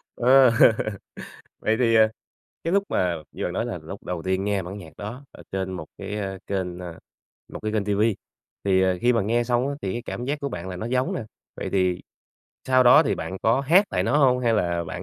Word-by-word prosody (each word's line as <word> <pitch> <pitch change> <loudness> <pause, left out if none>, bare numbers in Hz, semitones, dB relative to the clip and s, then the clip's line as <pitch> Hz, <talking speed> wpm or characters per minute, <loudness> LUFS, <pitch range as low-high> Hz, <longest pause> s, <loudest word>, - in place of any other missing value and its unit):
Ờ. 130 0 +6 1.1
Vậy 110 +1 +1
thì, 115 -2 +3
à, 110 0 +6 0.6
cái 165 - -1
lúc 200 0 +3
mà 90 -2 0 0.2
như - - -5
bạn - - -2
nói - - -2
là - - -4
lúc - - -9
đầu 90 -2 -4
tiên 95 +1 -1
nghe 100 -2 0
bản 95 +4 -7
nhạc 80 -5 -12
đó 120 +7 -7
ở - - -13
trên 95 -1 -2
một 85 -4 -6
cái, 105 - -5
ơ, 95 -2 -4
kênh 90 -3 -3
ơ, 85 -2 -8 0.5
một - - -6
cái 110 0 -2
kênh 105 -2 0
ti 100 -1 0
vi 105 0 +2 0.5
thì, 95 -1 +3
ờ, 95 -1 +1
khi 125 +1 +3
mà 115 - +1
nghe 120 +3 +1
xong 125 +2 +1
á 140 - -2
thì 95 -1 -2
cái 120 - -4
cảm 120 - -5
giác 145 +2 -2
của 140 - -2
bạn 95 -6 -6
là 90 - -5
nó 110 - -5
giống 125 +1 0
nè. - - -3 0.3
Vậy - - -4
thì 90 -2 +1 0.7
sau 130 0 +5
đó 125 0 +7
thì - - 0
bạn 95 - -5
có 115 +4 +3
hát 175 +9 +5
lại - - 0
nó - - +1
hông 125 -3 +4
hay 115 -2 +2
là 85 -4 0
bạn - - -6
105 Hz, 245 wpm, -24 LUFS, 95-125 Hz, 1.1 s, đó